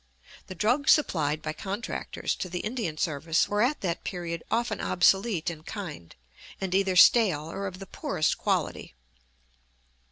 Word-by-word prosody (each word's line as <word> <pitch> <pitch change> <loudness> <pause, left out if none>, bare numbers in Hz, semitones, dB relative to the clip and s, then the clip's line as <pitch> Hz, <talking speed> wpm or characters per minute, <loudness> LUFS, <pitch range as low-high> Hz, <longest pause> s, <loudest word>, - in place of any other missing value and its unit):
The 185 - -8
drugs 245 - +3
supplied 155 - 0
by 155 - -3
contractors 200 +7 -4
to 185 - -4
the 180 0 -3
Indian 215 -9 -3
service 155 +2 +1
were 205 0 0
at 260 +6 +1
that 175 -3 -2
period 170 -3 -4
often 230 -2 -1
obsolete 190 -1 +2
in 160 -2 -10
kind, 160 - -8 0.4
and 190 -2 -3
either 190 -1 +2
stale 180 -6 +5
or 200 +2 -4
of 185 -1 -7
the 195 - -8
poorest - - -1
quality. - - -2
185 Hz, 150 wpm, -27 LUFS, 165-210 Hz, 0.4 s, stale